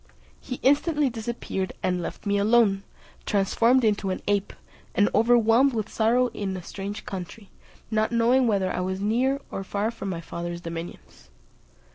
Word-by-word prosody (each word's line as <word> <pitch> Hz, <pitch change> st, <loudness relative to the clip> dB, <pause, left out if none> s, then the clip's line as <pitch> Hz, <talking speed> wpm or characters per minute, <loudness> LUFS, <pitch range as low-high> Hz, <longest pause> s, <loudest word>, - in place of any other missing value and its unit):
He 255 Hz, -, -6 dB
instantly 290 Hz, 0 st, +3 dB
disappeared, 225 Hz, -4 st, -4 dB
and 180 Hz, -1 st, 0 dB
left 170 Hz, -, -6 dB
me 200 Hz, 0 st, +1 dB
alone, 210 Hz, -2 st, +4 dB, 0.5 s
transformed 230 Hz, +5 st, +3 dB
into 210 Hz, -3 st, +1 dB
an 185 Hz, -, -3 dB
ape, 205 Hz, -1 st, +1 dB, 0.4 s
and 205 Hz, -, +4 dB
overwhelmed 235 Hz, +3 st, +4 dB
with 220 Hz, -1 st, -3 dB
sorrow 240 Hz, +3 st, +3 dB
in 190 Hz, -2 st, -3 dB
a 180 Hz, -, -8 dB
strange 200 Hz, +3 st, -6 dB
country, 195 Hz, +2 st, -7 dB, 0.4 s
not 215 Hz, +1 st, +1 dB
knowing 240 Hz, +2 st, +3 dB
whether 195 Hz, -4 st, +1 dB
I -, -, -2 dB
was 190 Hz, +1 st, -2 dB
near 245 Hz, +7 st, +1 dB
or 195 Hz, -, -4 dB
far 205 Hz, +3 st, -1 dB
from 200 Hz, -4 st, -6 dB
my 175 Hz, -3 st, -3 dB
father's 170 Hz, +1 st, -6 dB
dominions. 165 Hz, 0 st, -8 dB
210 Hz, 155 wpm, -25 LUFS, 190-235 Hz, 0.5 s, alone